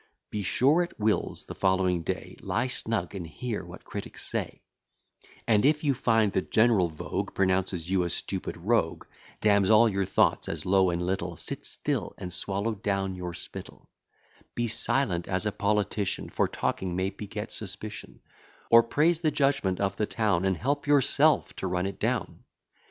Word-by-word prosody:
Be 105 - -2
sure 140 - +3
at 175 - -5
Will's, 105 0 0
the - - -7
following 95 -2 +1
day, - - -4
Lie 115 +3 0
snug, 115 -7 -2
and 90 -4 -5
hear 115 +7 -4
what - - -11
critics - - -7
say; - - -3 0.8
And, 105 -3 +4
if 150 +2 +3
you 145 -2 +3
find 115 -4 +2
the - - +2
general 110 -6 +3
vogue 80 - -4
Pronounces 95 -3 0
you 95 0 +2
a 85 - -1
stupid 95 +2 -4
rogue, 90 -1 0 0.4
Damns 100 -2 +4
all 110 +1 +7
your 100 -2 0
thoughts - - +2
as - - -3
low 95 0 +4
and 85 0 -1
little, 90 -2 -2
Sit - - -3
still, - - -2
and 90 -1 -6
swallow 100 +5 -1
down 100 -2 -1
your 90 -1 -5
spittle; - - -10 0.7
Be 120 0 0
silent 105 -6 +1
as 95 +2 0
a 105 - +1
politician, 105 -1 -1
For - - +1
talking 90 -2 -2
may 95 +1 0
beget 105 +2 -6
suspicion; 105 +1 -8 0.5
Or 115 - +9
praise 155 +8 +2
the 160 -2 +2
judgment 135 -11 +1
of 100 -1 -1
the 105 - 0
town, 105 -6 +1
And 95 -2 +1
help 145 - -1
yourself 145 +2 +3
to 95 - -3
run 90 0 -1
it 100 0 -5
down. - - -2
100 Hz, 170 wpm, -28 LUFS, 95-115 Hz, 0.8 s, Or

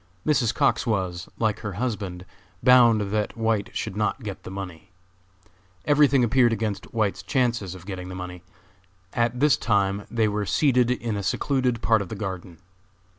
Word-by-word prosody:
Mrs. 130 -7 +2
Cox 140 -3 +1
was, 90 -5 -2
like 110 -2 0
her 100 -3 -5
husband, 95 -5 -4 0.4
bound 115 -5 +5
that 105 0 -1
White 110 -2 0
should - - -4
not 105 +4 -1
get 100 -3 -6
the - - -9
money. 95 -3 -8 1.0
Every 145 0 +5
thing 135 -1 +3
appeared 120 0 +4
against 110 -2 -3
White's 110 -3 0
chances 120 -8 -1
of 90 -1 -12
getting 95 -2 -6
the 95 - -7
money. 90 -1 -7 0.7
At 120 +1 0
this 145 -1 +4
time 100 -2 0
they 115 -2 +1
were 105 -1 -2
seated 125 +3 +3
in 120 -3 -1
a 100 - -2
secluded 125 +2 0
part 110 -2 +3
of 100 - -6
the 110 - -5
garden. 95 -4 -6
110 Hz, 170 wpm, -25 LUFS, 95-120 Hz, 1.0 s, bound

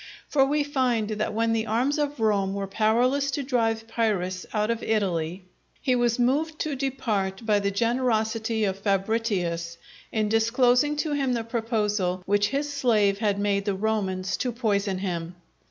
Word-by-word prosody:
For 275 -2 +3
we 290 +2 +1
find 255 -6 0
that 215 0 -2
when 225 +1 +1
the 225 0 -1
arms 255 +8 +1
of 290 -2 -2
Rome 200 -3 +1
were 200 0 -2
powerless 240 +8 +2
to 275 +2 -2
drive 225 -4 0
Pyrrhus 195 -6 -1
out 210 +1 0
of 230 0 -2
Italy, 185 -4 -1 0.3
he 255 - +1
was 240 -1 +1
moved 290 +6 +1
to 305 -2 -1
depart 230 -7 -2
by 210 -2 +3
the 200 0 0
generosity 225 0 0
of 195 -1 -1
Fabritius 195 -5 -1 0.3
in 215 -1 0
disclosing 245 +6 +3
to 300 +1 -2
him 275 -3 0
the 230 -1 -1
proposal 210 -6 -1
which 205 +1 +2
his 290 +4 -2
slave 215 -7 +2
had 205 -3 +1
made 200 -1 0
the 200 -2 0
Romans 190 -3 -1
to 250 - -1
poison 205 -5 0
him. 175 -2 -4
220 Hz, 165 wpm, -26 LUFS, 200-250 Hz, 0.3 s, For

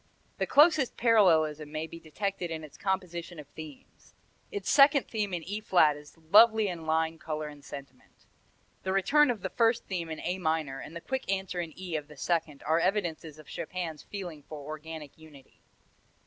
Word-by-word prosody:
The - - 0
closest 305 -3 +5
parallelism 160 -10 +3
may 155 +1 -3
be 165 +1 -10
detected 180 +3 -3
in 160 -1 -5
its 150 - -11
composition 180 -3 -3
of 150 - -8
themes. 155 -2 -12 0.4
Its 410 -2 -5
second 280 -1 +6
theme 210 -3 -2
in 175 -2 -3
E 205 +5 -4
flat 165 -8 +4
is 150 +2 -14
lovely 215 +6 +6
in 165 -3 -6
line, 160 0 +1
color 155 -1 -4
and 145 -1 -11
sentiment. 140 -2 -12 0.6
The 190 - -2
return 290 +10 +4
of 230 -5 -1
the - - -3
first 230 0 +2
theme 175 -4 -3
in 160 - -5
A 180 +2 -2
minor 155 -5 -1
and 160 - -9
the 170 - -6
quick 265 -2 -3
answer 190 -2 -2
in 165 -2 -5
E 180 -3 -4
of 150 -2 -3
the 150 -1 -14
second 160 -2 -1
are 160 +2 +3
evidences 170 -5 -1
of 155 - -13
Chopin's 170 -2 -5
feeling 175 -7 -7
for 155 +2 -9
organic 155 -1 -8
unity. 150 -4 -17
165 Hz, 185 wpm, -29 LUFS, 155-195 Hz, 0.6 s, second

